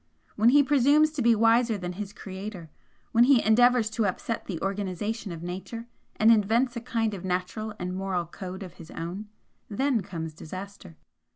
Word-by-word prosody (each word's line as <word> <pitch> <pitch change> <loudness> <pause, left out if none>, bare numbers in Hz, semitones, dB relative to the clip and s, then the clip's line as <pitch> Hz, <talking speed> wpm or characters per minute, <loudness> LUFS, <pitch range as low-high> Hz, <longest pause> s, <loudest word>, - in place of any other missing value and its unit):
When 220 +3 +5
he 285 +3 +6
presumes 290 +3 +4
to 300 -3 -3
be 235 -1 +5
wiser 230 0 +3
than 180 -2 -5
his 200 +1 -6
Creator, 190 -4 -8 0.4
when 235 +1 +5
he 265 -2 +6
endeavours 245 +1 +5
to 220 -2 0
upset 225 +4 -3
the 175 -5 -4
organisation 200 +2 -3
of 165 0 -7
Nature, 190 +6 -6 0.3
and 220 +1 +5
invents 230 +4 +3
a 235 - -4
kind 225 -3 -1
of 190 - -7
natural 190 +4 -3
and 180 -1 -4
moral 190 -2 -2
code 185 +3 -8
of 180 -3 -10
his 165 - -12
own, 180 +6 -6 0.4
then 255 +2 +1
comes 160 -4 -6
disaster. 185 +1 -9
210 Hz, 175 wpm, -27 LUFS, 185-230 Hz, 0.4 s, he